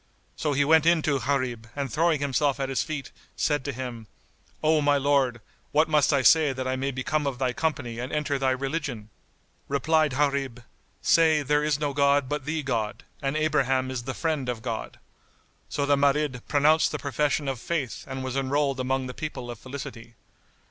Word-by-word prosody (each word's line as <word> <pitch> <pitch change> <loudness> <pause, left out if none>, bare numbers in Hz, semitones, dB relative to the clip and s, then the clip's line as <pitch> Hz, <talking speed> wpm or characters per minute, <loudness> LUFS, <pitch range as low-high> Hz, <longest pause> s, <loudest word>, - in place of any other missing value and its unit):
So 150 - -1
he 145 +1 +2
went 160 +1 +5
in 170 -2 +4
to 140 -3 +1
Gharib 125 -3 -2
and 140 -4 -3
throwing 160 -2 +2
himself 145 0 +1
at 135 -1 -1
his 135 - 0
feet, 150 -3 -5 0.2
said 145 -3 0
to 140 - -1
him, 120 -3 -6 0.6
"O 155 0 +4
my 145 0 +3
Lord, 135 -4 +1 0.3
what 155 +2 +3
must 150 -1 +3
I 140 -3 +2
say 155 0 +5
that 130 0 -4
I 130 - 0
may 135 +1 -1
become 140 +3 -1
of 135 -3 -2
thy 130 -1 0
company 120 -8 -2
and 125 +2 -4
enter 150 -2 -1
thy 135 -1 +2
religion?" 130 -5 -3 0.6
Replied 155 +1 +2
Gharib, 135 -4 0 0.4
"Say:—There 150 -3 +3
is 150 -1 +1
no 145 -2 -1
god 140 -1 +3
but 145 -1 -3
the 155 0 -2
God 115 -6 -2 0.2
and 135 +2 -1
Abraham 135 -4 +1
is 130 -2 -3
the 130 +2 -5
Friend 155 -6 -1
of 115 -2 -4
God." 115 -3 -4 0.7
So 140 - -1
the 145 0 +4
Marid 140 -2 +1
pronounced 150 +2 +3
the - - -2
profession 145 0 -1
of 135 -3 -2
Faith 145 -3 -3
and 130 -1 -5
was 130 0 -4
enrolled 135 0 0
among 130 +1 0
the 125 - -6
people 125 -4 -5
of 120 - -9
felicity. 130 -3 -8
140 Hz, 190 wpm, -26 LUFS, 130-150 Hz, 0.7 s, went